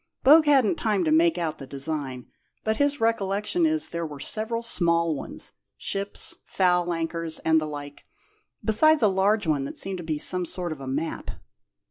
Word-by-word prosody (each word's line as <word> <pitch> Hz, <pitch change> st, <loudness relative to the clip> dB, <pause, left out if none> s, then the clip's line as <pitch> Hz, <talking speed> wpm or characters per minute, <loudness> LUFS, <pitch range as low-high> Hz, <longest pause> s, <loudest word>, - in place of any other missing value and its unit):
Bogue 305 Hz, +3 st, +7 dB
hadn't 270 Hz, -8 st, +4 dB
time 210 Hz, -4 st, 0 dB
to 155 Hz, -, 0 dB
make 165 Hz, +2 st, +4 dB
out 165 Hz, -3 st, -3 dB
the 135 Hz, -, -9 dB
design, 140 Hz, -2 st, -3 dB, 0.4 s
but 220 Hz, 0 st, 0 dB
his 285 Hz, 0 st, +1 dB
recollection 225 Hz, -, +1 dB
is 315 Hz, 0 st, 0 dB
there 170 Hz, 0 st, -4 dB
were 150 Hz, -3 st, -7 dB
several 225 Hz, +7 st, -2 dB
small 170 Hz, -6 st, +2 dB
ones 140 Hz, -, -6 dB, 0.3 s
ships, 200 Hz, +1 st, -2 dB
foul 180 Hz, -2 st, +1 dB
anchors, 165 Hz, -1 st, -3 dB
and 160 Hz, 0 st, +4 dB
the 155 Hz, -, -3 dB
like 145 Hz, -1 st, -8 dB, 0.6 s
besides 305 Hz, +6 st, +4 dB
a -, -, +6 dB
large 200 Hz, +2 st, +2 dB
one 150 Hz, -4 st, 0 dB
that -, -, -7 dB
seemed 190 Hz, -1 st, -3 dB
to -, -, -6 dB
be 160 Hz, -2 st, -2 dB
some 180 Hz, +4 st, +2 dB
sort 175 Hz, -1 st, -4 dB
of 150 Hz, -3 st, -7 dB
a 135 Hz, -, -7 dB
map." 150 Hz, +5 st, -3 dB
175 Hz, 180 wpm, -25 LUFS, 155-220 Hz, 0.6 s, Bogue